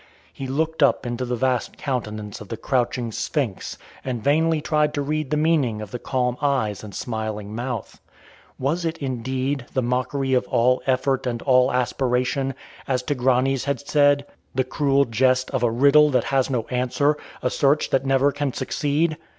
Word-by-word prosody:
He 135 - -6
looked 160 +4 -1
up 135 -3 +3
into 120 +1 -2
the 125 0 -1
vast 130 0 -1
countenance 110 -7 -4
of 105 - -9
the 115 - -5
crouching 120 -1 -1
Sphinx 120 -3 -3 0.3
and 125 -4 -3
vainly 160 +3 +3
tried 150 0 +1
to 145 - 0
read 155 0 -2
the 150 - +1
meaning 150 -8 +2
of 105 -2 -7
her 125 - -4
calm 125 -1 -1
eyes 125 -9 0
and 105 -2 -9
smiling 110 -3 -4
mouth. 120 -1 -5 0.6
Was 155 +7 -1
it, 165 0 -2
indeed, 130 0 -2
the 130 - +2
mockery 130 +2 -1
of 125 - +2
all 125 +1 +2
effort 130 0 +1
and 120 -1 -3
all 130 -2 +4
aspiration, 125 +1 0 0.3
as 125 -2 0
Tigranes 130 -1 +1
had 140 0 -1
said 145 -1 +3 0.3
the 130 - +2
cruel 140 +1 +2
jest 130 +2 +2
of - - -1
a 120 - +3
riddle 140 +6 +5
that 130 - +2
has 135 -1 +2
no 125 -4 0
answer, 130 +4 +1 0.3
a 125 - +1
search 145 +2 +2
that 135 0 +2
never 135 +1 +3
can 145 -2 -2
succeed? 150 +4 0
130 Hz, 175 wpm, -23 LUFS, 125-140 Hz, 0.6 s, riddle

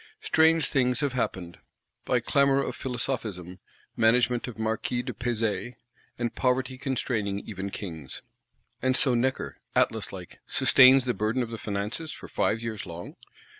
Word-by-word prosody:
Strange 160 -1 +4
things 125 -1 +1
have 140 -3 0
happened: 90 -8 -3 0.5
by - - +2
clamour 140 -1 +3
of - - -4
Philosophism, 110 -8 -4 0.4
management 120 +2 +3
of 120 - -7
Marquis 110 +2 -1
de 125 -1 -5
Pezay, 115 +1 -2 0.4
and 120 -1 -2
Poverty 130 0 0
constraining 115 -7 -1
even 100 -2 -6
Kings. 80 -8 -7 0.6
And 130 0 +2
so 130 -3 +5
Necker, 130 +2 -1 0.2
Atlas - - +1
like, - - -10
sustains 130 0 +6
the 125 - +1
burden 110 +5 0
of 115 - -7
the 115 - -5
Finances, 105 +10 -4
for - - -9
five 115 +1 0
years 110 -4 -5
long? 85 0 -8
120 Hz, 145 wpm, -27 LUFS, 105-130 Hz, 0.6 s, sustains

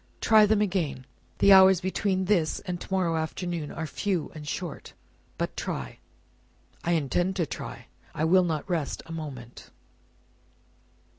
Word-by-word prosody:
"Try 215 -2 +5
them 210 0 +3
again. 175 -10 -1 0.3
The 200 - +6
hours 190 -1 +7
between 190 +1 -1
this 175 -5 +1
and 180 -2 -5
to - - -10
morrow 180 -3 +1
afternoon 160 0 -3
are 160 - -4
few 180 +2 -2
and 150 -1 -9
short, 170 0 -5 0.4
but - - -3
try." 65 -2 -5 0.8
"I 175 - +1
intend 175 +5 0
to 175 -4 0
try. - - -7 0.3
I 155 - 0
will 185 +3 +5
not 160 -2 -2
rest 165 -6 -2
a 165 - -11
moment." 135 -7 -8
175 Hz, 145 wpm, -27 LUFS, 155-190 Hz, 0.8 s, hours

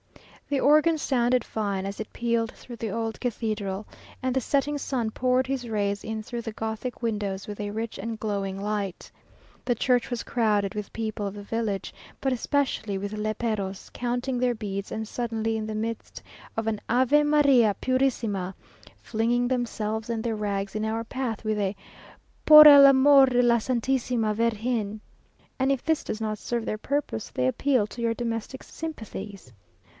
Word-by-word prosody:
The 285 -2 +1
organ 305 +4 +4
sounded 250 -4 +1
fine 200 -3 -2
as 200 0 -5
it 215 - -7
pealed 235 -1 0
through 240 -2 -11
the 225 -1 -3
old 225 +1 -3
cathedral, 215 -4 -2 0.4
and 255 0 -1
the 265 - +2
setting 285 +3 0
sun 245 -5 -2
poured 255 +2 +1
his 260 -3 -3
rays 205 -2 -1
in 220 0 -4
through 240 +1 -5
the 225 - -5
Gothic 220 +3 -5
windows 205 -4 -2
with 210 0 -7
a 205 - -3
rich 225 +2 -4
and 225 +2 -4
glowing 200 -3 -2
light. 200 -2 -3 0.5
The 245 - +1
church 245 +1 +1
was 245 -2 -3
crowded 210 -4 +1
with 210 -1 -5
people 220 -2 -3
of 200 - -6
the 205 - -8
village, 215 -2 -3 0.3
but 265 -1 0
especially 250 -6 -1
with 200 +2 -4
léperos, 215 -2 -3
counting 245 +1 -2
their 250 -1 +1
beads, 200 -2 -5
and 220 0 -4
suddenly 225 -1 -2
in 215 -1 -3
the 215 - -4
midst 225 +1 -4 0.4
of 225 - -1
an 215 -2 -1
"Ave 260 +5 +4
María 280 -8 +4
Purísima," 230 -8 0 0.5
flinging 240 +2 0
themselves 225 -3 -2
and 225 -1 -2
their 230 -2 -1
rags 200 -2 -3
in 215 - -1
our 220 +1 -1
path 230 -2 -4
with 215 -1 0
a 200 0 -1 0.7
"Por 305 0 +11
el 285 -1 +10
amor 275 0 +7
de 245 -1 +3
la 235 -1 +5
Santísima 240 -2 0
Virgen!" 220 -1 -1 0.6
and 265 +1 +2
if 270 - -1
this 320 -1 +1
does 215 - -4
not 215 -1 -3
serve 235 -2 -3
their 215 - -3
purpose, 280 - -2
they 125 0 0
appeal 255 - +2
to 235 +3 -9
your 230 -1 +1
domestic 230 +2 -4
sympathies. 205 - -8
225 Hz, 170 wpm, -26 LUFS, 210-250 Hz, 0.7 s, Por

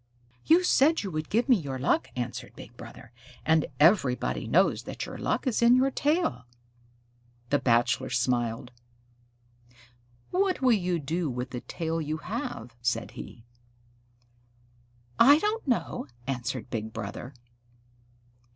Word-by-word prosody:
"You 340 +3 +6
said 315 -3 +3
you 195 - -4
would 155 -1 -4
give 230 +5 +1
me 250 -4 +5
your 140 -6 -5
luck," 135 +2 +1
answered 120 -1 -5
Big - - -12
Brother, 115 - -12 0.3
"and 160 0 +3
everybody 130 - +3
knows - - +3
that - - -5
your - - -8
luck - - -1
is 250 -4 0
in 235 +1 +6
your 265 +2 +3
tail." 285 - 0 1.0
The 145 - +3
Bachelor 120 +2 +2
smiled. 120 -1 -1 1.6
"What 375 0 +1
will 260 -2 +4
you 180 -5 +1
do 160 +2 -2
with 125 0 -4
the 125 - -5
tail 165 -1 -3
you 155 +1 -3
have?" 180 - -5
said 120 0 -1
he. 60 - -10 1.7
"I 285 +5 +8
don't 420 +2 -2
know," 245 - -1 0.2
answered 130 -3 -4
Big 110 -1 -3
Brother. 120 +6 -6
155 Hz, 135 wpm, -28 LUFS, -, 1.7 s, I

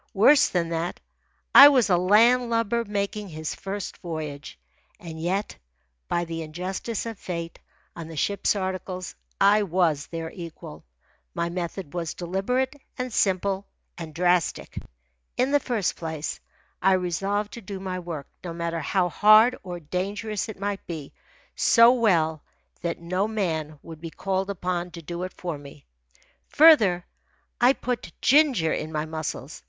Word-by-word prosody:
Worse 265 +9 +6
than 170 -2 -1
that, 170 +1 -3 0.5
I 280 - +12
was 265 -5 +4
a 185 - +4
land 230 +7 +4
lubber 230 0 +1
making 205 -1 -3
his 155 -1 -5
first 195 0 -6
voyage. 155 -4 -6 0.4
And 160 -2 -8
yet, 190 +5 -2 0.5
by 175 0 0
the 165 0 -5
injustice 185 +8 -4
of 225 -3 -6
fate, 170 -2 -5 0.4
on 165 -2 -7
the 165 - -9
ship's 200 +8 0
articles 185 -1 -4 0.3
I 205 +2 +5
was 170 -6 +1
their 165 -1 -5
equal. 160 - -10 0.5
My 170 - -1
method 175 -2 -5
was 170 -2 -3
deliberate, 195 - -1 0.2
and 250 -2 -4
simple, 195 0 0 0.3
and 160 -3 -8
drastic. 175 -1 0 0.6
In 255 +2 +2
the 290 - +4
first 230 -8 -1
place, 160 -2 -5 0.4
I 190 +1 +4
resolved 195 +3 -1
to 235 - -8
do 195 -1 -7
my 185 -1 -4
work, 165 -5 -6 0.2
no 170 -2 -5
matter 170 0 -3
how 180 +4 +1
hard 215 +8 +6
or 180 -2 -7
dangerous 200 +7 -3
it 210 - -8
might 200 0 -3
be, 155 -5 -7 0.4
so 230 +1 +6
well 170 - +2 0.4
that 170 0 -2
no 185 +4 -1
man 160 -8 -2
would 160 -2 -11
be 165 - -6
called 190 +3 -2
upon 180 -2 -2
to 165 - -9
do 170 +3 -5
it 185 0 -5
for 170 -5 -5
me. 145 0 -13 0.6
Further, 220 - +6 0.6
I 245 +2 +6
put 250 -3 -4
ginger 260 - +4
in 155 - -4
my 155 0 -2
muscles. 155 -2 -5
185 Hz, 150 wpm, -25 LUFS, 165-205 Hz, 0.6 s, I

